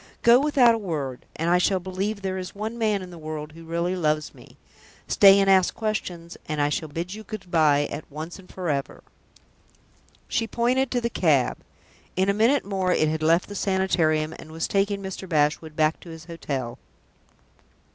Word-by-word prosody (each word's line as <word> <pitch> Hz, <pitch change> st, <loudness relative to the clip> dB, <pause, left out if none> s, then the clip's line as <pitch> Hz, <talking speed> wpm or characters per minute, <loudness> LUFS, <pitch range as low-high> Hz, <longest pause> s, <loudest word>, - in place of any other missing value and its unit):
Go 235 Hz, +1 st, +7 dB
without 275 Hz, -5 st, +4 dB
a 225 Hz, -, -1 dB
word, 145 Hz, -, -4 dB
and 165 Hz, -, -2 dB
I 180 Hz, -, +5 dB
shall 190 Hz, +1 st, +2 dB
believe 195 Hz, +3 st, -3 dB
there 190 Hz, -1 st, -2 dB
is 185 Hz, +1 st, -7 dB
one 215 Hz, +3 st, -4 dB
man 215 Hz, -4 st, 0 dB
in 180 Hz, -, -10 dB
the 170 Hz, -, -10 dB
world 155 Hz, -1 st, -6 dB
who 165 Hz, +1 st, -13 dB
really 170 Hz, +2 st, -1 dB
loves 155 Hz, -3 st, 0 dB
me. -, -, -17 dB, 0.5 s
Stay 200 Hz, -2 st, +7 dB
and 195 Hz, -, +2 dB
ask 190 Hz, -2 st, +4 dB
questions, 180 Hz, -6 st, -4 dB
and 155 Hz, -1 st, -2 dB
I 145 Hz, 0 st, +2 dB
shall 155 Hz, +2 st, -2 dB
bid 170 Hz, +5 st, -4 dB
you 215 Hz, -, -8 dB
good 200 Hz, -4 st, -8 dB
by 150 Hz, -3 st, +4 dB
at 145 Hz, +1 st, -7 dB
once 160 Hz, +5 st, -7 dB
and 185 Hz, -, -15 dB
forever!" 150 Hz, -7 st, -3 dB, 1.2 s
She 225 Hz, -, -1 dB
pointed 250 Hz, +3 st, +1 dB
to 245 Hz, -1 st, -1 dB
the 235 Hz, 0 st, -2 dB
cab. 150 Hz, -, +2 dB, 0.6 s
In 190 Hz, +2 st, +2 dB
a -, -, +3 dB
minute 230 Hz, +7 st, +3 dB
more 190 Hz, -2 st, 0 dB
it 155 Hz, -3 st, +2 dB
had 160 Hz, 0 st, -2 dB
left 165 Hz, +3 st, +3 dB
the 205 Hz, -, -8 dB
Sanitarium 170 Hz, -6 st, +1 dB
and 155 Hz, -, -11 dB
was 160 Hz, +1 st, -2 dB
taking 200 Hz, 0 st, 0 dB
Mr. 190 Hz, -1 st, -6 dB
Bashwood 155 Hz, 0 st, +1 dB
back 155 Hz, 0 st, +2 dB
to 175 Hz, -, -13 dB
his 160 Hz, -1 st, -10 dB
hotel. 140 Hz, -8 st, -5 dB
180 Hz, 190 wpm, -25 LUFS, 155-200 Hz, 1.2 s, Go